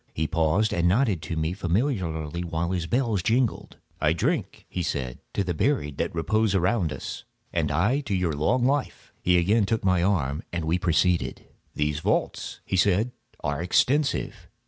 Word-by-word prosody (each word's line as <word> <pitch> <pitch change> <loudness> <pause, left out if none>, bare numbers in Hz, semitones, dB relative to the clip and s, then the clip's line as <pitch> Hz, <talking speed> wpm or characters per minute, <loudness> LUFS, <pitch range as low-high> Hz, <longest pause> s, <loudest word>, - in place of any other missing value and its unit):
He 80 - 0
paused 85 +6 +1
and 85 0 +2
nodded 100 - +2
to 80 +2 -4
me 80 +2 -1
familiarly, 90 - -1
while 85 0 -2
his 90 -3 -2
bells 115 -3 +1
jingled. 115 +4 0 0.2
"I 75 +1 +3
drink," 85 - -2
he 90 - -3
said, 65 -7 -3 0.2
"to 100 - +1
the 90 -2 -2
buried 75 - 0
that - - -2
repose 110 +5 +1
around 90 -2 +1
us." - - -6 0.3
"And - - +1
I 125 +9 +2
to 115 -9 -2
your 90 -4 0
long 115 - +1
life." 140 +1 -1
He 90 0 +3
again 100 +4 +3
took 110 -2 -1
my 95 -2 +3
arm, 80 -6 +1
and 85 -2 -3
we 85 +3 +1
proceeded. 90 0 +1 0.3
"These 75 0 0
vaults," - - -1
he 95 - -1
said, 100 +6 +3 0.3
"are 70 +2 -1
extensive." 135 - +1
90 Hz, 170 wpm, -26 LUFS, 80-110 Hz, 0.3 s, I